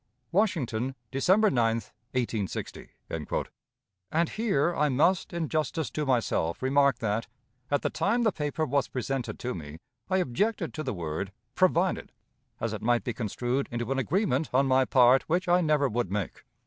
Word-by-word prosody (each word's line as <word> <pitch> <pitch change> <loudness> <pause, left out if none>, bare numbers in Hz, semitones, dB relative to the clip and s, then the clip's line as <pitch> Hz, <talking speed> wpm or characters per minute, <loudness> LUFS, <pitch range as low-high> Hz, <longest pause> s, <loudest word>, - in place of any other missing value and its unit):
"Washington, 135 - 0 0.2
December 190 +10 +4
9, 115 -4 +2 0.4
1860." 115 -6 -3 1.2
And 165 +1 +1
here 175 -7 +1
I 150 0 +2
must, 160 +8 +2
in 170 -2 -2
justice 155 0 -1
to 150 -2 -2
myself, 115 -8 0
remark 140 -1 +3
that, 110 0 -1 0.4
at 145 - +1
the - - 0
time 235 +4 +1
the 220 - +3
paper 150 -1 -2
was 140 -1 +1
presented 130 0 -3
to 125 - -3
me, 75 -2 -8 0.3
I 190 - +2
objected 185 - 0
to 155 - -4
the 130 -7 -3
word 85 +3 -4 0.2
"provided," 185 +1 +2 0.5
as 110 -1 -2
it 110 - -5
might 120 +1 +2
be 120 - -2
construed 120 +4 -2
into 120 +1 -3
an 135 - +1
agreement, 160 - +1
on 135 +2 +3
my 130 0 +4
part, 125 +1 +5
which 180 +3 +1
I 175 +1 +4
never 150 -3 +3
would 120 -5 -2
make. 100 -3 -3
135 Hz, 160 wpm, -28 LUFS, 120-170 Hz, 1.2 s, part